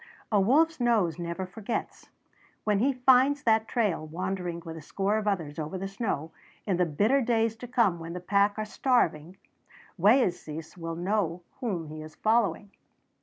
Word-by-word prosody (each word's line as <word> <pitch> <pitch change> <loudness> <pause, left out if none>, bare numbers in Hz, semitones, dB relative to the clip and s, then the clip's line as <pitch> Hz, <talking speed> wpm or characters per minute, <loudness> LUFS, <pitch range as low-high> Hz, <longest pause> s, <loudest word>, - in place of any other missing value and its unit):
A 205 -2 +4
wolf's 310 +9 +3
nose 215 -9 +2
never 170 +2 -3
forgets. 215 +4 -5 0.5
When 210 -2 +2
he 265 +6 +3
finds 260 +2 +4
that 220 -1 +3
trail 205 -11 0
wandering 175 0 -4
with 165 -1 -6
a 160 - -8
score 195 +7 -1
of 210 - -5
others 165 -7 -2
over 155 +5 -4
the 195 +1 -4
snow, 195 -6 -3 0.3
in 190 -4 0
the 180 -1 +2
bitter 215 - +2
days 225 -2 +1
to 245 - -8
come 230 -8 +2
when 165 +1 -7
the 180 - -4
pack 200 +3 +2
are 215 - -2
starving, 190 - 0 0.6
Wayeeses 175 - +1
will 165 -2 -5
know 175 -1 -1 0.2
whom 200 - -2
he 155 0 -8
is 155 0 -11
following. 215 -3 +1
195 Hz, 170 wpm, -28 LUFS, 170-225 Hz, 0.6 s, A